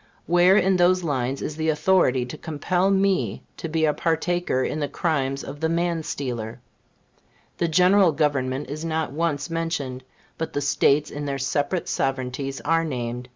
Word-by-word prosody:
Where 175 +3 +5
in 190 -1 +3
those 180 +1 +3
lines 135 -3 -1
is 150 - -4
the 160 0 0
authority 155 -6 +3
to 125 - -7
compel 175 +4 -1
me 190 - +1
to 165 - -5
be 160 0 +1
a 150 - +2
partaker 165 -4 0
in 155 - -2
the 145 - -1
crimes 140 -3 -1
of 145 +1 -8
the 160 +1 0
man 170 0 0
stealer? 120 -6 -4 1.0
The 170 - +2
General 180 +2 +5
Government 140 -2 0
is 155 +3 -6
not 160 -4 -1
once 150 0 -2
mentioned; 150 -6 -3 0.4
but 160 - -3
the - - 0
States 145 +1 +2
in 145 0 -5
their 140 -1 -2
separate 145 +6 -1
sovereignties 135 0 -2
are 165 +2 +2
named. 125 -4 -4
150 Hz, 165 wpm, -24 LUFS, 135-170 Hz, 1.0 s, Where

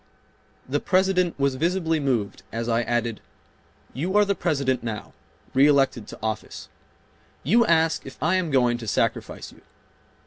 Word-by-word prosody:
The 145 +3 0
President 185 -3 +1
was 140 -1 +2
visibly 165 +2 0
moved 125 -8 -1
as 115 +1 -3
I 115 0 +2
added, 120 -2 -2 0.7
"You 175 - -1
are 210 - +5
the 200 - +1
President 140 -7 0
now, 110 -3 -6 0.4
reelected 135 -4 +3
to - - -9
office. 110 0 -4 0.7
You 225 - +3
ask 165 -1 +2
if - - -10
I 160 +3 +1
am 185 -3 +1
going 125 -4 +2
to 115 - -8
sacrifice - - -2
you. - - -19
140 Hz, 145 wpm, -24 LUFS, 120-170 Hz, 0.7 s, are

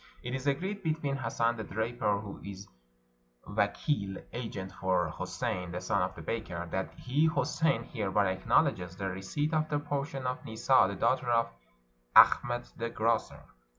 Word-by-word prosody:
'' - - -27
It 125 - -4
is 130 +1 -3
agreed 190 +9 -1
between 155 -5 -1
Hassan 115 -1 0
the 110 - -4
draper, 105 0 -1
who 100 -2 -8
is 100 0 -8 0.8
vakeel 100 -10 -1
(agent) 105 -6 -5
for 90 -4 0
Houssein 90 -1 -3
the 90 - -2
son 100 +1 0
of 90 +1 -1
the 85 - -9
baker, 90 -4 -3
that 95 - -2
he, 145 +5 +2
Houssein, 160 0 +1
hereby 100 -4 0
acknowl 95 - +4
edges 90 0 -5
the 95 -1 -2
receipt 120 - -2
of 155 0 +1
the 145 - +1
portion 145 -2 -3
of 125 0 -2
Nissa 110 +3 +4
the 100 - -4
daughter 120 +3 +1
of 115 -1 +2 0.6
Achmet 120 0 +6
the 115 0 -2
grocer." 115 0 0
115 Hz, 165 wpm, -31 LUFS, 95-135 Hz, 0.8 s, Achmet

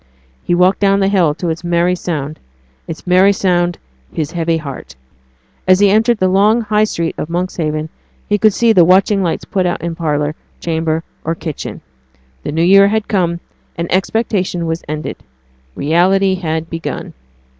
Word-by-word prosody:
He 175 - +1
walked 180 +2 +3
down 195 -1 +3
the 195 - +2
hill 175 -7 +2
to 175 +1 -3
its 165 +2 -4
merry 175 +1 +1
sound 155 -4 -4 0.5
its 165 - -7
merry 185 +2 +5
sound, 175 -3 0 0.3
his 155 -1 -3
heavy 165 -1 0
heart. 140 - -8 0.7
As 185 0 +5
he 200 -1 +5
entered 225 +3 +3
the 185 - +2
long 205 +5 +3
High 215 -1 +2
Street 170 -5 -2
of 155 - -4
Monkshaven 165 -3 -2 0.4
he 205 0 +1
could 215 +1 +5
see 230 +2 +3
the 180 -4 +6
watching 195 +3 +4
lights 170 -3 -2
put 185 -2 0
out 175 - -3
in 170 0 -2
parlour, 150 -2 -1 0.3
chamber, 160 -1 -1 0.2
or 165 +1 -2
kitchen. 155 -3 -6 0.6
The - - -4
new 160 +2 0
year 195 +3 +6
had 215 +1 -1
come, 175 -4 0 0.4
and 170 0 -4
expectation 190 -3 0
was 165 +1 -3
ended. 155 0 -4 0.6
Reality 190 +6 +2
had 160 -3 -3
begun. 165 -1 -5
175 Hz, 165 wpm, -16 LUFS, 165-195 Hz, 0.7 s, the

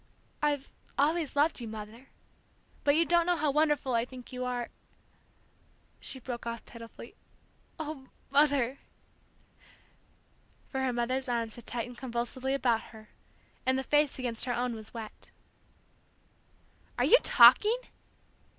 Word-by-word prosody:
"I've 290 -2 0 0.3
always 310 +1 +1
loved 290 -1 +2
you, 235 - -5
Mother, 220 +4 -9 0.8
but 285 0 +4
you 335 +2 +4
don't 340 0 +3
know 355 - +3
how 305 -3 +1
wonderful 295 -3 +2
I 230 -1 +3
think 250 0 -11
you 255 0 -3
are 245 -1 -3 0.7
" - - -36
She 265 - -4
broke 240 -1 -6
off 235 0 -5
pitifully, 230 -1 -11 0.7
"Ah, 305 -3 -6 0.3
Mother!" 280 -3 +3 1.9
For 265 - -3
her 260 - +1
mother's 250 +2 0
arms 230 -2 -1
had 240 - -13
tightened 240 +1 -4
convulsively 260 +2 -2
about 240 -4 +2
her, 215 -1 -14 0.5
and 260 0 +2
the 265 - -1
face 295 +1 +2
against 245 -3 -1
her 245 - -1
own 245 0 -1
was 220 -1 -9
wet. 225 -2 -9 1.7
"Are - - +2
you - - +7
talking?" 440 +3 +7
255 Hz, 135 wpm, -30 LUFS, 235-290 Hz, 1.9 s, you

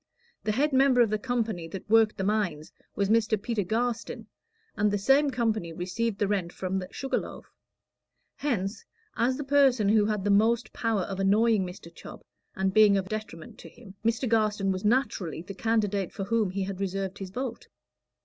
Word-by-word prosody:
The 215 - 0
head 285 +5 +1
member 260 -1 +5
of 225 -3 +3
the 215 - 0
company 225 -8 -2
that 190 +4 -8
worked 220 0 +4
the 195 - -2
mines 190 -7 -1 0.2
was 200 - 0
Mr. 220 0 +2
Peter 225 0 -2
Garstin, 230 +4 -2 0.5
and 210 0 +2
the 205 - 0
same 270 +8 +3
company 220 -9 -1
received 190 +5 -2
the 205 - 0
rent 190 -4 -1
from 190 +1 -3
the 185 - -6
Sugar 270 - -2
Loaf. - - -9 0.9
Hence, 215 -8 -2 0.3
as 255 +2 +1
the 290 - -4
person 270 -6 +3
who 210 -1 +4
had 210 -3 -1
the 205 - +1
most 225 +3 +2
power 225 -4 0
of 190 +1 -5
annoying 205 0 +3
Mr. 180 -2 -11
Chubb, - - -11 0.3
and 190 0 0
being 210 -1 +6
of 190 -1 -3
detriment 215 -7 -7
to 165 - -11
him, 195 +2 -15
Mr. 230 +3 0
Garstin 215 -3 +1
was 185 0 -3
naturally 210 - 0
the 195 - -8
candidate 205 -3 0
for 195 - -5
whom 215 0 +1
he 195 +1 -2
had 190 0 -5
reserved 195 0 -3
his 195 -1 -6
vote. 255 - -5
210 Hz, 190 wpm, -27 LUFS, 195-230 Hz, 0.9 s, being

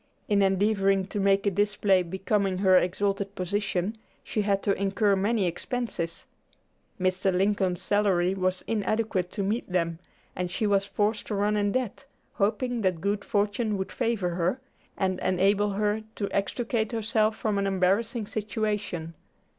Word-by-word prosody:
In 205 -1 +3
endeavoring 195 0 +2
to 205 - -3
make 195 0 +3
a 200 - +3
display 200 -1 +2
becoming 190 +2 -1
her 190 -1 +4
exalted 195 +2 +1
position, 200 +2 -2 0.2
she 215 - -1
had 200 -1 0
to 200 - +2
incur 200 +1 +1
many 205 +1 +1
expenses. 175 -2 -3 0.7
Mr. 185 +1 +1
Lincoln's 190 -1 +1
salary 190 -3 +2
was 185 -1 -1
inadequate 215 -3 0
to 200 - -2
meet 205 0 -2
them, 170 -2 0 0.4
and 180 0 -2
she 180 +5 -1
was 200 -1 +2
forced 210 +1 -1
to 210 - -2
run 205 +1 +1
in 205 -1 +1
debt, 255 +2 -3 0.3
hoping 235 +3 0
that 185 -4 +1
good 200 +3 -1
fortune 205 +1 0
would 190 - -4
favor 230 -7 0
her, 175 +7 0 0.4
and 185 -1 0
enable 200 +2 +2
her 210 +2 0
to 200 - -2
extricate 220 +2 -1
herself 220 -1 +1
from 210 -2 0
an 200 - 0
embarrassing 200 +5 +1
situation. 210 -6 -3
200 Hz, 150 wpm, -27 LUFS, 185-210 Hz, 0.7 s, her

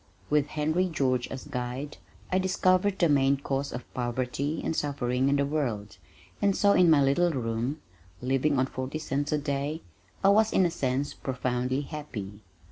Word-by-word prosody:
With 150 -1 +3
Henry 155 +5 0
George 130 -6 0
as 130 - -7
guide, 125 +4 -5 0.3
I 185 - +3
discovered 185 +1 +2
the 170 - +4
main 140 -2 +3
cause 140 0 -2
of 120 - -8
poverty 130 +5 -2
and 160 - -1
suffering 135 -3 0
in 140 - +3
the 140 0 +2
world, 120 -9 -2 0.4
and 200 -1 +3
so 200 - +4
in 180 -3 +5
my 150 -3 +6
little 155 +6 +3
room, 125 0 -2 0.4
living 135 +3 +1
on 130 - +3
forty 130 +2 -4
cents 145 -2 -2
a 150 - +2
day, 145 +1 -2 0.4
I 195 - +6
was 215 +2 +4
in 190 - +4
a 170 - +1
sense 135 -2 -1
profoundly 125 0 -2
happy. 120 -10 -7
140 Hz, 170 wpm, -28 LUFS, 130-155 Hz, 0.4 s, my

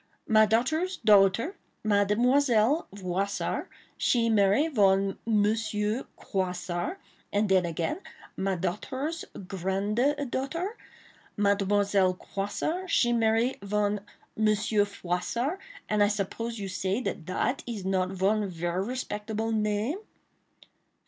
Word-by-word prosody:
My 215 -1 +6
daughter's 315 - +1
daughter, 210 - +4 0.3
Mademoiselle 235 - +3
Voissart, 195 +1 -2 0.3
she 230 -2 +2
marry 205 +8 +4
von 195 -7 +2
Monsieur 215 +1 +1
Croissart, 185 - -2 0.3
and 205 +1 +2
den 185 -2 +3
again, 170 - -2 0.3
my 195 0 0
daughter's 260 - -3 0.2
grande 200 +9 0 0.2
daughter, 335 - -2 0.6
Mademoiselle 200 -2 +2
Croissart, 310 - -3
she 240 -6 +3
marry 225 +2 +2
von 205 +1 0 0.4
Monsieur 215 -1 +2
Froissart; 205 - -2 0.3
and 210 -1 +1
I 205 - +6
suppose 215 +3 -3
you 200 -2 -4
say 190 +3 -1
dat 250 - -3
dat 190 +8 -1
is 215 -6 -5
not 185 -1 +1
von 195 +2 +1
ver 175 +1 -2
respectaable 220 -2 -3
name." 215 - 0
210 Hz, 105 wpm, -28 LUFS, 195-235 Hz, 0.6 s, My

